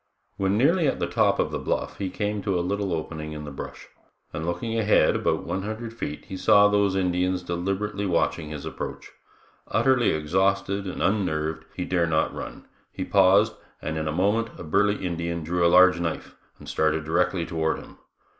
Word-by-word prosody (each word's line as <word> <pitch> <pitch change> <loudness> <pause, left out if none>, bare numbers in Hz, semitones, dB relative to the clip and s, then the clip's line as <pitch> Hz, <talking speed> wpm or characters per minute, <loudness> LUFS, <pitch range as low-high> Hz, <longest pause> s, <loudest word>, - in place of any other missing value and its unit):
When 95 +1 +1
nearly 160 +6 +3
at - - 0
the - - 0
top - - +2
of - - 0
the - - -2
bluff - - -3
he 95 -2 -2
came 105 +2 -2
to 95 -2 0
a 85 - -1
little 100 0 -1
opening 80 -1 -4
in 75 -1 -7
the 75 - -7
brush, 70 - -8 0.5
and 80 +1 -4
looking 90 +7 -2
ahead 110 -1 +3
about - - 0
one 90 +3 -3
hundred 110 +3 -5
feet 75 -10 -6
he 95 - -7
saw 100 +2 +6
those 100 -2 +2
Indians 90 0 0
deliberately 95 +4 -2
watching 85 -3 0
his 75 -2 -6
approach. - - -6 0.6
Utterly 130 -3 +3
exhausted 95 +5 0
and 95 - -3
unnerved, 80 -6 0
he 90 - -3
dare 85 -2 +1
not 80 -1 +1
run; - - -8 0.3
he 95 - -4
paused, 100 +3 +4 0.3
and 80 - -4
in 80 0 -2
a - - 0
moment 105 +7 +1
a - - -8
burly 100 +5 +1
Indian 85 -1 -3
drew 85 +2 0
a 85 - +5
large 90 0 +6
knife 85 -2 -4 0.2
and - - -13
started 80 0 +1
directly 85 +1 +1
toward 80 -2 -1
him. - - -13
90 Hz, 190 wpm, -25 LUFS, 80-100 Hz, 0.6 s, saw